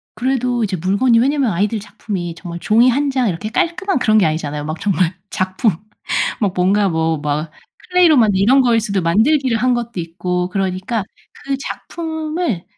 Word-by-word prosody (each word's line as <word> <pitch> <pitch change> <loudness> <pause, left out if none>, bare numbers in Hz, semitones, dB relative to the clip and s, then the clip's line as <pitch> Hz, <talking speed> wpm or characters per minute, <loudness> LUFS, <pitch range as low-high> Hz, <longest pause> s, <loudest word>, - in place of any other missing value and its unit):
그래도 250 -2 0
이제 195 -3 -2
물건이 200 +8 +2
왜냐하면 270 -1 +2
아이들 205 +5 0
작품이 200 -5 -5
정말 170 -1 -7
종이 230 +6 +4
1 280 +3 0
장 260 -3 +1
이렇게 190 +4 -3
깔끔한 345 - 0
그런 215 -2 +3
게 185 - +4
아니잖아요. 150 -2 -3
막 155 +1 -4
정말 185 -3 +1 0.2
작품 185 +4 0 0.7
막 200 -4 +1
뭔가 195 +3 +2
뭐 160 -2 0
막 150 +2 -2 0.4
클레이로 360 -4 +5
만든 215 -6 +4
이런 245 +8 +5
거일 235 -2 +3
수도 200 -4 -1
만들기를 230 - +2
한 250 +2 +2
것도 235 -4 -4
있고 180 +2 -3
그러니까 190 +3 -2 0.4
그 275 -1 -1
작품을 315 - -4
210 Hz, 355 characters per minute, -18 LUFS, 180-255 Hz, 0.7 s, 클레이로